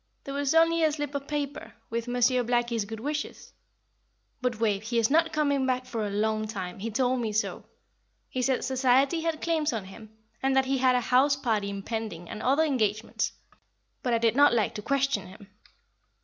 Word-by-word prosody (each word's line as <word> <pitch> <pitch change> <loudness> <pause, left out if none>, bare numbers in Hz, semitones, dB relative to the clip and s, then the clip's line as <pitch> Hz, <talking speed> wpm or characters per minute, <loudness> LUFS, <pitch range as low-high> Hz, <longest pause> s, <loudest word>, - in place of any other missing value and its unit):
"There 275 - -6
was 285 +1 0
only 330 0 +4
a 310 - +4
slip 290 -1 -4
of 280 0 -4
paper, 290 -1 -4 0.2
with 235 +1 -2
Monsieur 245 +1 +2
Blackie's 240 -2 0
good 220 +1 -7
wishes. 295 +5 -5 0.9
But 250 -3 -1
Wave, 210 -3 +1
he 230 +2 -2
is 230 +2 +2
not 325 +1 +3
coming 285 -3 +1
back 255 0 0
for 225 -4 -3
a - - -4
long 215 +1 0
time 190 -4 -6
he 225 +4 -3
told 250 +3 +1
me 225 -2 -2
so. 215 +2 -2 0.6
He 255 - -3
said 255 0 +1
society 265 +4 +2
had 325 -1 -2
claims 315 -3 +1
on 220 -5 -4
him, 215 +3 -12 0.3
and 270 0 +1
that 265 0 +4
he 265 0 0
had 255 -1 +4
a 250 - +2
house 265 +4 +3
party 220 -7 -1
impending, 200 -3 -5
and 215 - -6
other 275 +5 +3
engagements; 225 -7 0 0.7
but 245 - -1
I 230 - +3
did 230 0 +2
not 285 -3 +6
like 220 0 +1
to 210 - -5
question 275 -6 0
him." 200 +2 -14
250 Hz, 195 wpm, -27 LUFS, 220-280 Hz, 0.9 s, not